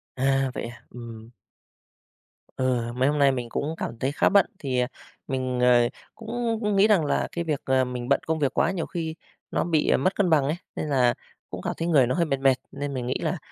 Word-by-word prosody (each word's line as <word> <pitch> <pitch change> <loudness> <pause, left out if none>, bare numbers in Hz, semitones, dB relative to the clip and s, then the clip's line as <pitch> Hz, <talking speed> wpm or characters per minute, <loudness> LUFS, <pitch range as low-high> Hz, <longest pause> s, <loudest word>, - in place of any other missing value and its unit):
À, 135 0 +1
vậy - - -4
à? 115 0 -10
Ừm. 115 -1 -10 1.2
Ừ, 125 -2 0
mấy 130 +3 +2
hôm 150 0 0
nay 140 -1 +5
mình 125 -3 -4
cũng 155 +6 -2
cảm 115 - -5
thấy 135 +3 0
khá 145 - +3
bận. 200 0 +5
Thì, 130 -4 -1
ờ, 125 - +1 0.4
mình, 130 -2 -2
ờ, 125 -1 +5 0.3
cũng 230 0 -2 0.2
nghĩ 195 +2 +5
rằng 195 -8 +3
là - - 0
cái 170 - -3
việc, 150 -4 -1
ờ, 130 -1 +3
mình 125 0 -5
bận 140 - +4
công 160 0 0
việc 140 -3 +1
quá 170 - +2
nhiều 180 -4 -2
khi 160 -3 -4 0.4
nó - - +1
bị, 160 -3 +1
ờ, - - +4
mất 185 +8 +1
cân 195 -3 +2
bằng 155 -4 +4
ấy, 145 +4 0 0.2
nên 155 - -3
là 125 -4 +3 0.4
cũng - - -6
cảm - - -2
thấy 165 - -2
người 145 -7 +4
nó 125 - 0
hơi 170 -1 +2
mệt 140 -3 -1
mệt, 135 -1 +4 0.2
nên 140 0 -4
mình 125 -2 -3
nghĩ 130 - 0
là, - - -1
135 Hz, 235 wpm, -25 LUFS, 125-160 Hz, 1.2 s, nay